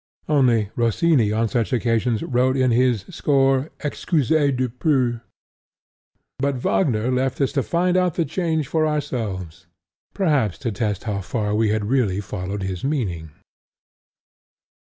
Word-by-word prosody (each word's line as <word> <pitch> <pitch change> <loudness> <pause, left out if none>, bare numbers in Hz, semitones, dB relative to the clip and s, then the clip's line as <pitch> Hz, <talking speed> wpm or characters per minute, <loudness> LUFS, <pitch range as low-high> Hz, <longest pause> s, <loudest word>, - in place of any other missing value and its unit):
Only, 120 -8 +2
Rossini 120 0 +2
on 115 +2 +1
such 115 +2 -1
occasions 115 -2 0
wrote 130 +1 +1
in 130 -1 +3
his 120 -4 +2
score 135 0 +2
"Excusez 150 -1 +1
du 130 0 0
peu," 125 -1 0 1.2
but 140 0 0
Wagner 125 - +1
left 130 0 0
us 135 - +1
to 140 - 0
find 175 +5 0
out 180 -3 +2
the 170 - +1
change 160 -1 -1
for 155 +1 +1
ourselves, 105 - -4 0.5
perhaps 145 - +1
to 115 - +1
test 105 -1 -2
how 100 -3 -2
far 105 +2 -2
we 110 0 +2
had 105 0 0
really 110 -5 +1
followed 100 0 -5
his 95 -2 -4
meaning. 100 - -2
125 Hz, 135 wpm, -22 LUFS, 105-145 Hz, 1.2 s, in